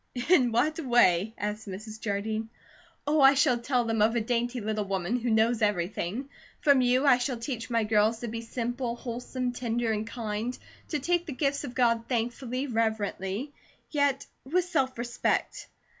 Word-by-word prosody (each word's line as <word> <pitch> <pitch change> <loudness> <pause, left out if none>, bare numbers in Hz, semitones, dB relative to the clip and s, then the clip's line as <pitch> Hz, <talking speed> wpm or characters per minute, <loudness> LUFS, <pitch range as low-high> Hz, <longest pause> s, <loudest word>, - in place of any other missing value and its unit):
"In 255 -10 +5
what 295 +8 +1
way?" 225 - +3
asked 210 +1 -4
Mrs. 215 +3 -7
Jardine. 215 +2 -2 0.6
"Oh, 295 +1 +2
I 270 +1 +8
shall 255 -3 +3
tell 245 0 +1
them 225 -1 0
of 225 +2 +3
a - - +3
dainty 240 +2 -1
little 215 -1 -2
woman 195 +4 -1
who 240 +1 -2
know 220 +1 +4
everything. 205 +4 -1 0.3
From 280 -3 +5
you 250 +3 +3
I 255 -3 +6
shall 250 0 -1
teach 230 -1 -5
my 230 -2 +2
girls 215 +1 +2
to 240 - -3
be 230 +1 -4
simple, 240 +1 -3
wholesome, 245 +1 -4
tender, 235 -1 -1
and 215 0 -2
kind; 230 +1 -3 0.3
to 305 - -1
take 345 +4 0
the 295 - -4
gifts 280 +2 0
of 255 -3 -7
God 230 -2 +2
thankfully, 245 +2 -2
reverently, 220 0 -2 0.4
yet 285 -2 +1 0.2
with 345 +7 +1
self 265 -8 0
respect. 240 0 -1
235 Hz, 170 wpm, -28 LUFS, 220-260 Hz, 0.6 s, I